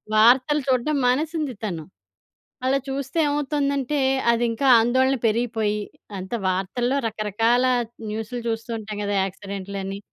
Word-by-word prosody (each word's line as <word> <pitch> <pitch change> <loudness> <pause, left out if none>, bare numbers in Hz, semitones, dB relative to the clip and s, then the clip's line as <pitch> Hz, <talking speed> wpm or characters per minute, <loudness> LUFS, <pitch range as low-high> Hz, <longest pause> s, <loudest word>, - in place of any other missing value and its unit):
వార్తలు 255 +7 +5
చూడ్డం 260 +4 +2
మానేసింది 300 +2 0
తను. 170 -7 -3 0.8
అలా 270 +1 +3
చూస్తే 275 +3 -4
ఏమవుతుందంటే, 285 -1 0 0.3
అదింకా 235 +3 0
ఆందోళన 260 +3 +2
పెరిగిపోయి, 220 -2 0 0.4
అంతా 190 +6 -4
వార్తల్లో 240 +8 -1
రకరకాల 225 +4 +1 0.5
న్యూసులు 225 +3 -4
చూస్తూ 225 +1 -4
ఉంటాం 210 -1 -7
గదా! 205 0 -1
యాక్సిడెంట్లని 195 0 -6
240 Hz, 105 wpm, -23 LUFS, 210-270 Hz, 0.8 s, వార్తలు